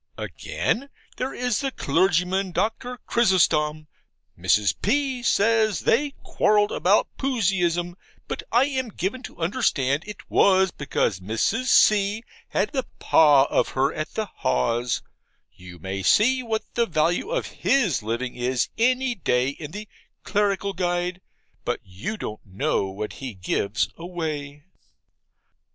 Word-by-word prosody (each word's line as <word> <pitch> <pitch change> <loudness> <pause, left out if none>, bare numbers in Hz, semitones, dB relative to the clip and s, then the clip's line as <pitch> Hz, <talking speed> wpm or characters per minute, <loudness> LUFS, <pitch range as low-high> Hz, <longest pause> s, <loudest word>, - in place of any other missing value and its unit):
Again, 275 +5 -3 0.3
there 260 +1 -2
is 250 +1 -1
the 275 -1 -1
clergyman, 180 - +1
Doctor 245 +5 -2
Chrysostom, 155 -8 +2 0.5
Mrs. 95 +4 +2
P. 265 +3 0
says 220 -2 +2
they 285 +4 +1
quarrelled 210 -1 +2
about 195 +4 +2
Puseyism, 180 -9 0 0.3
but - - -4
I 240 +3 +5
am 260 -4 -2
given 205 +6 -3
to - - -10
understand 160 - 0
it 210 -1 -9
was 190 -1 +4
because 125 -8 -1
Mrs. 110 - -1
C. 210 -2 +4 0.2
had - - -1
the 265 -3 -2
PAS 145 -4 +5
of - - +2
her 135 +3 +2
at 155 - -5
the 220 - -1
Haws 125 - -1 0.5
you 90 -1 -13
may 95 +3 -5
see 255 - +4
what 225 -3 -2
the 235 -1 +1
value 170 - 0
of - - -1 0.2
his 215 - +2
living 115 +4 -3
is 125 0 -1
any 255 +2 +2
day 125 - +1
in 145 +1 -7
the 210 +6 -8 0.4
'Clerical 200 -1 0
Guide;' 175 0 -1 0.4
but - - -2
you 100 - -6
don't 110 - -6
know 95 0 -1
what 100 +3 -5
he 130 -5 -6
gives 100 +4 -1
away. 155 -5 -5
180 Hz, 135 wpm, -24 LUFS, 135-225 Hz, 0.5 s, I